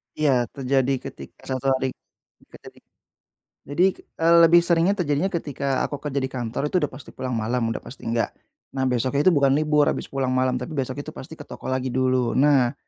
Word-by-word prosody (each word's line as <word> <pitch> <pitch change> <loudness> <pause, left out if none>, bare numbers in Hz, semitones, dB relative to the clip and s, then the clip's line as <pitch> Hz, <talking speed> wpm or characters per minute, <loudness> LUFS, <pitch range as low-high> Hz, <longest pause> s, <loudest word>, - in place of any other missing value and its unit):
Iya, 130 -6 +2
terjadi 135 0 +1 0.2
ketika - - -13 0.2
1 135 - -11
hari 130 0 -1 0.6
kerja - - -13
di - - -21 0.8
jadi, 170 +7 +2
eee, 165 +1 +1
lebih 170 +1 +7
seringnya 170 +1 +3
terjadinya 165 +3 0
ketika 140 -5 -2
aku 145 - -5
kerja 140 -2 -2
di 130 - -1
kantor, 125 +1 -3
itu 180 +1 0
udah 145 - 0
pasti 130 +1 -12
pulang 130 - -4
malam, 115 0 -1
udah - - -2
pasti 135 - -12
enggak. 115 0 -1 0.4
Nah, 130 -1 0
besoknya 130 +4 +1
itu 185 - +5
bukan 140 -4 +3
libur 150 0 +3
habis - - -2
pulang 130 -2 -1
malam, 130 -1 +1
tapi 155 - -6
besok 130 0 -3
itu 155 +2 -7
pasti 160 +5 -10
ke 145 - -10
toko - - -7
lagi 130 0 -1
dulu. 130 -2 +1
Nah, 135 -3 +3
135 Hz, 195 wpm, -23 LUFS, 130-150 Hz, 0.8 s, lebih